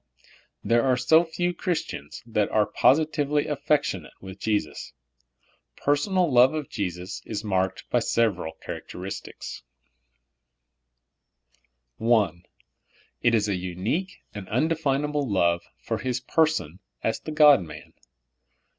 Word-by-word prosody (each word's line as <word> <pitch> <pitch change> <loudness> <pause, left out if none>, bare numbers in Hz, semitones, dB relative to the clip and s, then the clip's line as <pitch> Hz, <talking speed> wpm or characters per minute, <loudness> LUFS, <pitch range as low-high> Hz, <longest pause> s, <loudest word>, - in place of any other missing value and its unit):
There 115 +3 +3
are 130 -2 +3
so 145 +7 +5
few 175 +1 -2
Christians 170 -6 -4
that 105 -3 0
are 105 -1 +3
positively 150 +2 +2
af 145 -2 -4
fectionate 95 - 0
with 95 0 -10
Jesus. 105 -7 -2 0.8
Personal 165 +2 +1
love 125 +5 +6
of 150 -3 -4
Jesus 90 -2 -4
is 110 -1 -5
marked 95 -2 -1
by - - +4
several 100 -8 0
characteristics: 95 +2 -7 2.4
I. 110 -6 +4 0.9
It 120 -1 +4
is 105 -2 +1
a 100 - 0
unique 95 - -3
and 100 -3 -8
undefinable 145 -1 0
love 85 -3 +2 0.2
for - - -2
His 125 -1 -2
person 130 - 0 0.2
as 110 - 0
the 155 - -7
God 150 -5 +7
man. 75 -4 -10
120 Hz, 115 wpm, -25 LUFS, 95-150 Hz, 2.4 s, God